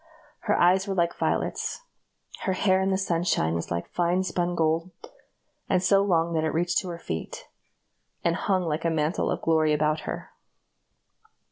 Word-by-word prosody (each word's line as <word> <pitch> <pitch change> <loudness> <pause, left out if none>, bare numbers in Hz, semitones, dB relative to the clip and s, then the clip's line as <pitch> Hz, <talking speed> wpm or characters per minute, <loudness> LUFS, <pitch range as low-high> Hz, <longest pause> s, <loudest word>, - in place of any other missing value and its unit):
Her 210 - +4
eyes 185 +3 +4
were 195 - -2
like 170 -1 +1
violets. - - -2 0.6
Her 190 - +1
hair 190 0 +2
in 190 - +1
the 190 - +2
sunshine 170 - 0
was 85 0 -3
like 85 0 -4
fine 175 +1 +1
spun 175 0 -1
gold, 165 +1 +1 0.8
and 180 - +2
so 195 +2 +4
long 170 -4 +1
that 160 -1 +1
it 160 - 0
reached 175 +1 +2
to 185 - -6
her 170 - -5
feet, - - -6 0.8
and - - +2
hung 190 -3 0
like 160 -1 -2
a 165 - +2
mantle 160 +1 0
of - - -2
glory 155 -2 +3
about 150 +1 +1
her. - - -6
175 Hz, 170 wpm, -26 LUFS, 160-190 Hz, 0.8 s, Her